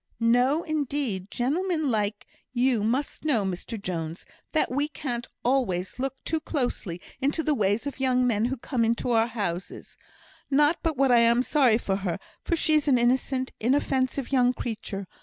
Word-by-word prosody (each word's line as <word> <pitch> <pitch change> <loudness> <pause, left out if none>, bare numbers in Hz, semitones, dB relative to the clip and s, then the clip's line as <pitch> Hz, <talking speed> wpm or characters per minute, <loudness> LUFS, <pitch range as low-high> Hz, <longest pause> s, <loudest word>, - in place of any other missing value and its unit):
"No, 245 +7 +3
indeed! 280 - -2
Gentlemen 315 +3 0
like 210 -1 -1 0.3
you 245 -3 +2
must 255 +6 -1
know, 250 -10 +2
Mr 190 +4 -4
Jones, 170 -3 -4 0.3
that 310 - +1
we 285 +3 +1
can't 245 -5 -4 0.2
always 190 -7 0
look 270 0 -2
too 320 - 0
closely 245 - -3 0.2
into 290 +4 +1
the 305 - +2
ways 210 -2 +1
of 285 -1 -5
young 255 -1 +2
men 225 -2 +2
who 265 +2 -1
come 230 -2 0
to 245 - -3
our 225 0 +3
houses. 200 -6 -5 0.5
Not 295 +4 +3
but 320 -4 -1
what 270 -1 +3
I'm 235 +1 +5
sorry 255 -6 +4
for 195 -4 -1
her, 190 -4 -2 0.3
for 340 - 0
she's 310 -2 +2
an 265 -3 +5
innocent, 255 +2 +1
inoffensive 265 +1 0
young 250 -2 +4
creature. 210 -4 -5
250 Hz, 160 wpm, -26 LUFS, 220-280 Hz, 0.5 s, I'm